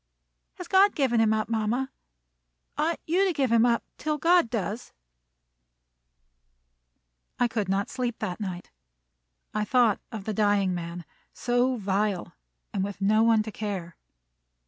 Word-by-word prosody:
"Has 360 - -8
God 390 +2 +5
given 260 -6 +2
him 220 -1 +3
up, 215 -1 0
mama? 230 +4 -1 0.8
Ought 330 +2 0
you 355 +5 +2
to 385 - +2
give 270 -5 0
him 230 +1 +5
up 235 -1 +1 0.2
till 305 0 -1
God 340 -4 +4
does?" 225 +1 -4 2.5
I 245 - +4
could 215 -5 -2
not 195 +1 0
sleep 245 -3 -3
that 180 - -4
night. 185 -4 -6 0.8
I 215 0 0
thought 235 -2 +3
of 220 -4 -6
the 215 - -3
dying 205 -2 +2
man, 170 -1 -6 0.3
so 245 +1 +1
vile, 200 -3 -1 0.4
and 190 - 0
with 200 0 -5
no 210 +2 +3
one 225 -1 +4
to 220 - -7
care! 195 -5 -5
220 Hz, 145 wpm, -27 LUFS, 200-250 Hz, 2.5 s, God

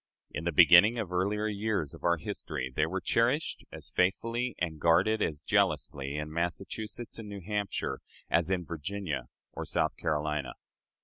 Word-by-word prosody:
In - - -5
the 85 - +1
beginning 90 +8 +7
and 105 -6 -3
earlier 100 +4 0
years 105 -7 -1
of - - -12
our 85 0 +3
history 75 -8 -4
they 80 - +2
were 95 +3 -3
cherished 120 - +1
as - - -7
faithfully 115 +6 0
and 80 -2 -3
guarded 105 +7 +4
as 75 -6 -1
jealously 70 +1 +1
in 75 +1 -4
Massachusetts 100 +8 -4
and 105 -2 -7
New 100 -1 -7
Hampshire 100 -8 -2 0.3
as 85 +1 +2
in 90 -2 0
Virginia 85 0 -4 0.3
or - - -4
South - - 0
Carolina. 75 -2 -1
90 Hz, 160 wpm, -30 LUFS, 80-105 Hz, 0.3 s, beginning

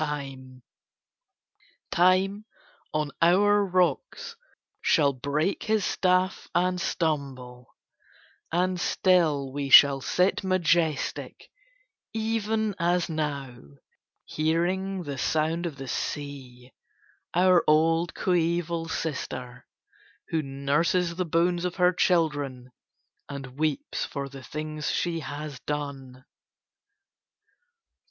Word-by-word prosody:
Time 135 -4 -5 2.3
on 150 -1 -1
our 205 +4 +4
rocks 185 - -1 0.5
shall 145 -5 +3
break 145 +8 -1
his 215 -2 +1
staff 185 0 +1
and 180 +1 +1
stumble: 135 -8 -3 0.8
and 180 +2 0
still 155 -10 +2
we 140 -1 -3
shall 135 0 +8
sit 180 +8 +1
majestic, 170 -4 0 0.6
even 220 -1 -1
as 175 +1 +1
now, 145 -5 -3 0.7
hearing 180 +4 -1
the 140 -4 -5
sound 160 +5 0
of 155 - -7
the 135 0 -8
sea, 130 -3 -6 0.6
our 180 0 +5
old 165 +2 +3
coeval 170 -2 0
sister, 130 -6 -5 0.6
who 160 - 0
nurses 150 +6 0
the 180 +1 -2
bones 170 +2 +1
of 180 0 -2
her 180 -1 +3
children 145 -8 0 0.6
and 135 -2 -7
weeps 155 - -1
for 140 -1 -4
the 135 0 -10
things 155 +3 -5
she 170 -2 -1
has 145 -3 -6
done. 135 -3 -5
160 Hz, 95 wpm, -26 LUFS, 140-180 Hz, 2.3 s, shall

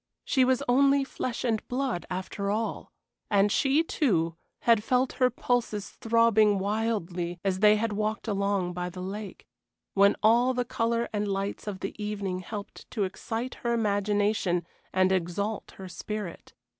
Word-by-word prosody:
She 260 - +3
was 260 +1 +2
only 275 +2 +4
flesh 255 -2 -4
and 225 -4 0
blood 255 -7 -2
after 190 +2 -3
all, 220 +2 -2 0.4
and 205 0 +3
she, 280 +7 +3
too, 170 - +1 0.3
had 230 -3 +4
felt 250 +2 +1
her 255 -1 +3
pulses 235 -4 -1
throbbing 225 -2 +3
wildly 190 -4 -2
as 190 -1 +1
they 210 +1 +6
had 215 0 -1
walked 215 +2 -2
along 200 -3 0
by 180 0 -3
the 180 +1 -9
lake, 200 +2 -6 0.5
when 200 0 +5
all 240 +4 +4
the 245 0 0
color 230 0 0
and 210 0 -1
lights 200 +1 -3
of 195 -2 -4
the 195 - -3
evening 200 -3 -2
helped 200 +2 -8
to 215 - -1
excite 225 +6 -4
her 235 -1 0
imagination 205 -4 +1 0.3
and 185 0 +3
exalt 190 +4 -2
her 190 - -8
spirit. 205 0 -6
210 Hz, 155 wpm, -28 LUFS, 195-230 Hz, 0.5 s, they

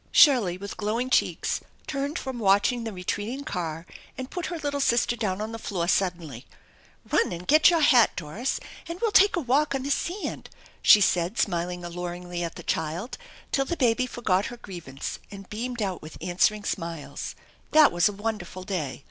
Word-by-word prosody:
Shirley 245 - +6
with 200 +1 -7
glowing 230 +5 -1
cheeks - - +1 0.3
turned 280 +2 -2
from 260 -2 -5
watching 215 +4 +3
the 225 - -3
retreating 205 +8 -3
car 165 - -4 0.3
and 260 0 -6
put 355 - -3
her 345 - -4
little 285 -2 -2
sister 240 -2 +2
down 205 -5 -2
on 215 +1 -4
the 225 - -6
floor 175 -6 -2
suddenly. 170 -10 -1 0.3
" - - -27
Run - - +3 0.2
get 310 +7 +6
your 335 -2 +2
hat, 250 -6 +5
Doris, 195 - -3 0.3
and 335 +2 -6
we'll 455 0 +1
take 405 0 +6
a - - +1
walk 280 +1 +1
on 265 - -2
the 280 - -3
eand! 365 +7 -2 0.2
" - - -25
she 210 - +8
said, 180 +2 +2
smiling 175 -1 -1
alluringly 175 0 -5
at 170 - -4
the - - -9
child, 170 - -3 0.3
till 275 - +1
the 340 +5 -3
baby 250 0 +2
forgot 205 -6 0
her 245 - -8
grievance 170 - -7
and 195 -2 -10
beamed 240 +1 -3
out 190 -3 -3
with 155 0 -10
answering 205 +4 +1
emiles. 165 -6 -5 0.3
That 310 -1 +7
was 175 +3 +3
a - - -6
wonderful 200 -3 -4
day. 155 -10 -3
210 Hz, 185 wpm, -26 LUFS, 175-260 Hz, 0.3 s, she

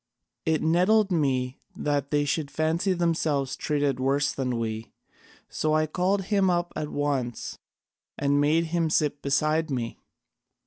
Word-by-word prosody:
It 160 -1 +2
nettled 185 +6 +3
me 130 -5 0 0.2
that 145 -2 -1
they 145 -1 +1
should 145 0 -1
fancy 165 +6 0
themselves 160 -6 0
treated 145 -3 0
worse 140 +2 +1
than 125 -3 -2
we, 110 -1 -4 0.6
so 155 0 0
I 155 0 +3
called 185 +5 0
him 195 -1 +2
up 175 -1 0
at 155 -1 -3
once 135 -5 -2 0.6
and 145 0 +2
made 155 +3 +3
him 165 -2 +2
sit 150 -2 +1
beside 155 +3 +1
me. 120 -4 -3
150 Hz, 140 wpm, -26 LUFS, 140-165 Hz, 0.6 s, nettled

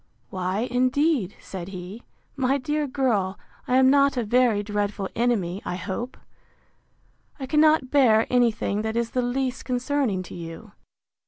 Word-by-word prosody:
Why, 185 +2 -2
indeed, 255 - +1
said 180 -3 -7
he, 190 +3 -8 0.3
my 270 0 +1
dear 295 +2 -1
girl, 225 -8 0 0.3
I 250 - +2
am 260 0 +6
not 280 -1 +3
a 245 - +1
very 230 -2 +2
dreadful 205 -1 -2
enemy, 210 -6 0
I 180 - -3
hope! 195 +8 -5 1.2
I 265 - -4
cannot 305 -1 +3
bear 230 -6 +5
any 245 -2 +4
thing 210 -1 -2
that 220 +1 -3
is 235 -1 -1
the 255 - 0
least 255 +1 -2
concerning 250 -6 -1
to - - -11
you. 170 +6 -9
240 Hz, 150 wpm, -24 LUFS, 200-260 Hz, 1.2 s, am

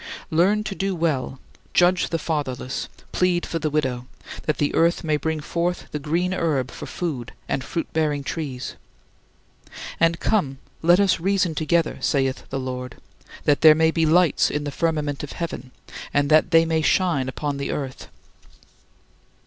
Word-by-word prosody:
"Learn 190 +7 +3
to 215 - -4
do 195 -1 -2
well, 150 -6 -1 0.4
judge 180 +1 +4
the 165 - 0
fatherless, 140 -5 -3 0.2
plead 180 -1 +1
for 165 - -3
the 155 - -1
widow," 130 -5 -1 0.4
that 155 - +1
the 145 - 0
earth 170 +1 +2
may 155 -2 +1
bring 160 +1 -1
forth 170 +3 -2
the 150 - -3
green 170 +5 0
herb 145 -8 0
for - - -8
food 140 -9 -4
and 135 - -1
fruit 165 +5 -3
bearing 150 -3 0
trees. 135 -4 -4 1.3
"And 165 0 +3
come, 145 -12 0 0.2
let 175 +3 +5
us 200 -4 +3
reason 185 -1 +1
together, 160 +1 0
saith 135 -2 0
the 135 - -3
Lord" 125 -1 -5 0.4
that 145 -1 +2
there 155 -1 +9
may 160 0 +3
be 160 -1 +1
lights 170 0 +4
in 150 - -2
the 145 - -3
firmament 150 -2 -1
of 145 - -7
heaven 170 -6 -5 0.5
and 145 +1 +2
that 155 0 +5
they 165 0 +5
may 160 -1 +1
shine 155 -6 +2
upon 145 +1 -3
the 140 - -3
earth. 135 -3 -4
155 Hz, 165 wpm, -23 LUFS, 140-170 Hz, 1.3 s, there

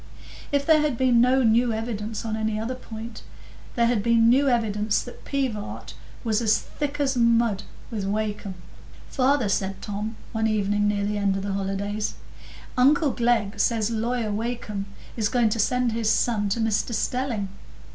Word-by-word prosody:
If 285 -1 +1
there 315 -2 +5
had 295 -5 0
been 245 -2 +4
no 255 +2 +4
new 235 +1 +4
evidence 220 -1 -4
on 220 -1 -2
any 220 -1 -1
other 225 +4 -2
point, 225 -2 -8 0.5
there 235 -2 +3
had 230 -3 +2
been 230 +1 +4
new 270 +3 +4
evidence 215 -3 +1
that 245 - -11
Pivart 255 -7 -3 0.3
was 225 -1 +1
as 220 -1 +4
"thick 290 -1 -5
as 275 -2 +1
mud" 235 -4 +3 0.3
with 210 -4 -3
Wakem. 205 -2 -2 0.5
"Father," 265 -3 +2
said 195 -1 -1
Tom, 210 +2 -4 0.2
one 220 0 0
evening 205 -1 +1
near 205 -1 0
the 205 0 -1
end 200 -1 +1
of 195 - -4
the 200 -1 -2
holidays, 200 +2 -2 0.6
"uncle 285 +3 +4
Glegg 235 -4 +1
says 225 -1 +1
Lawyer 230 0 -1
Wakem 210 -2 -3 0.3
is 215 -3 0
going 240 -3 +3
to 225 +2 -2
send 250 +2 +2
his 225 -1 0
son 215 -3 +2
to 205 - -1
Mr 225 +1 0
Stelling. 240 -4 -1
225 Hz, 165 wpm, -25 LUFS, 210-245 Hz, 0.6 s, there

